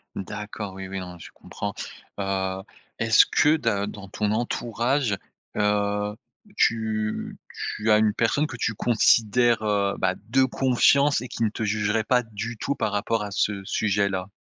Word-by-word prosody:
D'accord, 105 +1 -6
oui, 95 0 -7
oui, 95 0 -5
non 90 -1 -7
mais 90 - -13
je - - -10
comprends. - - -6 0.5
Heu, 95 -1 -2 0.4
est-ce 115 0 +6
que 150 +2 +3
de 105 -8 0
dans 105 -1 -8
ton 105 +2 -1
entourage, 120 +1 0 0.4
heu, 105 0 0 0.4
tu 110 - 0 0.4
tu 110 +1 +1
as 105 - +7
une 110 -1 +3
personne 120 +7 +1
que 125 - -8
tu 115 - -1
considères, 115 +1 +3
heu, 100 -2 +1
bah 95 0 +1
de 130 +3 +4
confiance 135 +2 +3
et 125 - -6
qui 115 - -3
ne 110 - +3
te 110 - -5
jugerait 105 +1 0
pas, 125 +3 +2
du 115 +1 -6
tout, 140 - -1
par 110 - -1
rapport 105 +2 0
à 105 - -6
ce 100 -1 -1
sujet-là? 100 -2 0
105 Hz, 165 wpm, -25 LUFS, 100-115 Hz, 0.5 s, as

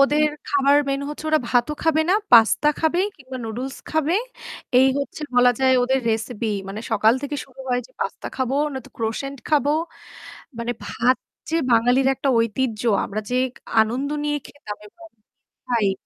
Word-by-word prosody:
ওদের 300 +2 +4 0.2
খাবার 280 0 +3
মেইন 275 0 0
হচ্ছে 300 +1 -7
ওরা 310 0 +3
ভাতও 250 +4 +2
খাবে 315 -1 +3
না, - - +5 0.2
পাস্তা 235 +6 +6
খাবে 325 +2 +2 0.2
কিংবা 265 -2 -9
নুডলস 245 +4 -5
খাবে। 315 +2 +1 0.6
এই 265 +1 +6
হচ্ছে 280 +2 -5
বলা 245 0 +6
যায় 260 0 +4
ওদের 265 +2 +1
রেসিপি। 220 0 -2 0.2
মানে 205 +2 -5
সকাল 220 +1 +4
থেকে 290 +1 -3
শুরু 265 0 -15
হয় 245 0 +1
যে 255 - -28
পাস্তা - - -3
খাবো 260 0 -1 0.2
নয়তো 265 -3 -7
crossant 250 +5 -3
খাবো। 290 -1 +3 0.9
মানে 235 +1 -2
ভাত 250 +2 +1 0.3
যে 330 - +1
বাঙালির 245 +3 +4
একটা 275 - -2
ঐতিহ্য 230 0 -1 0.2
আমরা 215 +2 -4
যে 250 - -1 0.5
আনন্দ 245 +6 0 0.2
নিয়ে 295 0 0
খেতাম 210 -8 -9
এবং 335 +8 -16 0.6
খাই। 225 -5 +2
260 Hz, 160 wpm, -22 LUFS, 230-285 Hz, 0.9 s, পাস্তা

